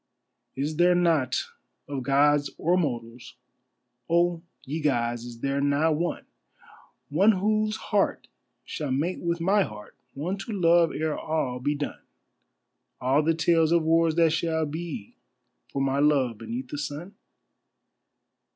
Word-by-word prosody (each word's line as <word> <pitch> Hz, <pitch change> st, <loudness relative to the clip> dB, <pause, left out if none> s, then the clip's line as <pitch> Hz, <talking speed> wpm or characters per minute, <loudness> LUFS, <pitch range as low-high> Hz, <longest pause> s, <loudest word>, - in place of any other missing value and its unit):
Is 150 Hz, +3 st, -3 dB
there 175 Hz, +1 st, +5 dB
not, 160 Hz, -8 st, +2 dB, 0.4 s
of 140 Hz, -2 st, -4 dB
Gods 145 Hz, +2 st, +3 dB
or 175 Hz, +3 st, +2 dB
mortals, 120 Hz, -7 st, -3 dB, 0.7 s
oh, 170 Hz, 0 st, +2 dB, 0.2 s
ye 150 Hz, +4 st, -4 dB
Gods, 120 Hz, -5 st, 0 dB
is 120 Hz, -1 st, -10 dB
there 140 Hz, 0 st, 0 dB
not 145 Hz, +3 st, +2 dB
one— 170 Hz, +3 st, -2 dB, 0.8 s
One 195 Hz, +9 st, +4 dB
whose 215 Hz, +2 st, +1 dB
heart 205 Hz, -3 st, -1 dB, 0.4 s
shall 150 Hz, -3 st, -4 dB
mate 155 Hz, +8 st, -1 dB
with 170 Hz, 0 st, -1 dB
my 195 Hz, +5 st, +3 dB
heart, 105 Hz, -, -6 dB, 0.2 s
one 180 Hz, +8 st, -3 dB
to 220 Hz, +3 st, -6 dB
love 170 Hz, -1 st, +4 dB
ere 155 Hz, 0 st, -2 dB
all 135 Hz, -6 st, -2 dB
be 145 Hz, +3 st, 0 dB
done, 145 Hz, 0 st, -5 dB, 1.0 s
All 135 Hz, +4 st, +2 dB
the 165 Hz, +1 st, +1 dB
tales 165 Hz, -1 st, +3 dB
of 170 Hz, -1 st, +3 dB
wars 165 Hz, 0 st, +3 dB
that 165 Hz, -2 st, +4 dB
shall 160 Hz, -1 st, 0 dB
be 155 Hz, -8 st, -6 dB, 0.5 s
for 135 Hz, -, -1 dB
my 135 Hz, 0 st, 0 dB
love 140 Hz, -6 st, +2 dB
beneath 245 Hz, +3 st, -5 dB
the 145 Hz, -, -5 dB
sun? 150 Hz, +7 st, -6 dB
155 Hz, 140 wpm, -26 LUFS, 140-170 Hz, 1.0 s, there